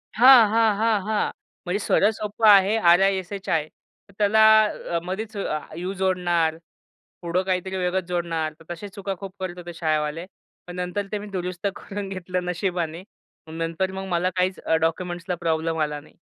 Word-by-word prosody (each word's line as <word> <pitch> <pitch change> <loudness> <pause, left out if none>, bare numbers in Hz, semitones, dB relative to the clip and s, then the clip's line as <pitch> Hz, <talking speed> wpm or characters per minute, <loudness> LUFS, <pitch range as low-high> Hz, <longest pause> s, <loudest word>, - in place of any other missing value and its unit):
हां, 245 -1 +8
हां, 220 -1 +3
हां, 220 -1 +2
हां. 215 0 0 0.3
म्हणजे 185 +3 -1
सरळ 205 - +3
सोप्पं 215 +1 0
आहे 200 +1 +6
आर-आय-एस-एच-आय. 190 -3 +2 0.4
तर - - -19
त्याला 215 +1 +4 0.5
अ, 170 - +2
मध्येच 210 +4 -5
अ, 155 -6 -2 0.2
यू 180 +3 -3
जोडणार. 175 -4 +1 0.6
पुढं 175 +1 0
काहीतरी 190 0 -2
वेगळंच 185 0 0
जोडणार. 165 -3 -2
तर 160 - -17
तश्या 200 +4 -9
चुका 200 -1 -4
खूप 195 -1 -8
करत 185 -1 -5
होते 175 -1 -8
शाळेवाले. 155 0 -1 0.4
पण 175 - -8
नंतर 180 +3 -3
ते 210 - -1
मी 205 - -8
दुरुस्त 180 +2 -3
करून 200 -1 -6
घेतलं 185 -1 -4
नशिबाने. 175 -2 -2 0.4
मग 160 - -10
नंतर 165 +3 -1
मग 190 0 -5
मला 175 +1 +1
काहीच 185 0 0
अ, 160 - 0
डॉक्युमेंट्सला 175 +2 -2
प्रॉब्लेम 160 0 0
आला 150 -1 -1
नाही. 150 - -19
180 Hz, 165 wpm, -24 LUFS, 170-200 Hz, 0.6 s, हां